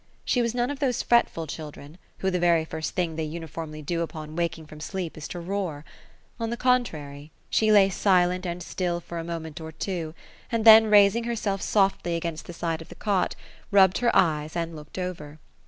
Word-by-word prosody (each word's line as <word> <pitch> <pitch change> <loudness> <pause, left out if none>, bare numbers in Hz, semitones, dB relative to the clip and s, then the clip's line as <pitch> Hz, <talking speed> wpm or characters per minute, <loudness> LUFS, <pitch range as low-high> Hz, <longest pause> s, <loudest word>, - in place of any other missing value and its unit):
She 245 - +2
was 235 0 -1
none 245 +2 0
of 285 - -6
those 255 -4 0
fretful 235 -8 +2
children, 150 +1 -9 0.2
who, 190 - -1
the 180 - 0
very 170 -2 +3
first 160 0 -5
thing 175 -4 -1
they 160 - -1
uniformly 155 -1 -6
do 170 +3 -2
upon 155 -2 -6
waking 170 -1 -2
up 150 - -18
from 155 - -10
sleep, 175 +1 -5
is 155 - -7
to 175 - -6
roar; 170 -4 -4 0.5
on 230 -1 -2
the 235 - -3
contrary, 155 - -1 0.2
she 215 -1 +3
lay 200 -2 +7
silent 180 -2 +2
and 175 -1 -4
still 175 0 -2
for 170 0 -7
a - - -4
moment 165 -2 -6
or 160 0 -7
two, 165 -1 -4 0.4
and 230 -1 0
then 220 0 +10
raising 210 +2 +5
herself 210 -4 -2
softly 195 -4 +1
against 165 -1 -4
the - - -6
side 165 -1 -3
of 165 - -12
the - - -11
cot, 200 -3 0 0.4
rub^ 195 -2 +7
bed - - -2
her 240 -1 +2
eyes, 155 -2 +2
and 165 -1 -3
looked 150 +2 -11
over. 165 -5 -5
175 Hz, 205 wpm, -26 LUFS, 160-200 Hz, 0.5 s, then